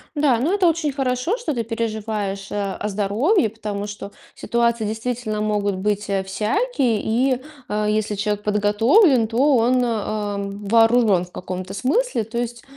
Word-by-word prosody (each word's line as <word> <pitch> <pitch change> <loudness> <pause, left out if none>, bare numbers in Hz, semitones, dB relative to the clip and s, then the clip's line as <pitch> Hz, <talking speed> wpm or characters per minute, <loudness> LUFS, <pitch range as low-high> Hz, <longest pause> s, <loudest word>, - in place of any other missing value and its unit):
Да, 290 -5 +3
но 290 +11 0
это 390 -3 +3
очень 325 -2 +1
хорошо, 265 - -1
что 320 - -3
ты 235 - -1
переживаешь 215 -3 -3
а 200 -2 -2
о 210 - -3
здоровье, 215 - +1
потому 210 -2 -5
что 205 -1 -8 0.2
ситуации 235 -1 0
действительно 220 0 -3
могут 205 -2 0
быть, 210 +2 -1
э, 195 -1 0
всякие, 225 - 0
и, 250 +3 +1 0.3
а, 210 0 -1
если 215 0 0
человек 205 0 -2
подготовлен, 225 - +4
то 265 +5 +3
он, 250 +2 +3
а, 215 -3 -2
вооружен 205 0 +2
в 180 - -20
каком-то 185 0 -6
смысле. 280 - 0
То 230 +2 -7
есть 240 0 -4
220 Hz, 155 wpm, -21 LUFS, 205-250 Hz, 0.3 s, подготовлен